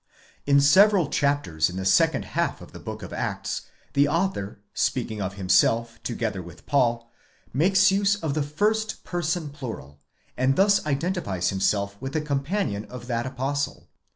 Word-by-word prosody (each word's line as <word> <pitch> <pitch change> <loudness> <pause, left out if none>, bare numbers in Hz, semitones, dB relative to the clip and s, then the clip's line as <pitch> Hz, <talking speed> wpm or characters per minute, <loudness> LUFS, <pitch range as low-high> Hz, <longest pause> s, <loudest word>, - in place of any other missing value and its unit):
In 140 0 +5
several 185 +3 +5
chapters 120 - +1
in 90 - -8
the 95 0 -4
second 95 - +3
half - - 0
of - - -12
the - - -10
Book - - -7
of - - -8
the - - -5
Acts - - -3 0.3
the 140 +1 +4
author, 165 - -1 0.2
speaking 110 -2 -1
of 95 0 -3
himself 115 +4 +2
together 115 -5 -3
with 85 0 -13
Paul, 120 -4 +1 0.4
makes 190 +7 +4
use 200 +1 +3
of 160 -8 -3
the 155 - 0
first 210 +10 -1
person 170 -3 -2
plural,® 115 - -8 0.4
and 130 +1 +2
thus 200 +3 +4
identifies 140 - -1
himself 100 +1 0
with 135 0 -5
the 155 - 0
companion 140 - -2
of 125 -1 -9
that 120 0 -2
apostle. 135 +2 -3
140 Hz, 160 wpm, -25 LUFS, 110-165 Hz, 0.4 s, In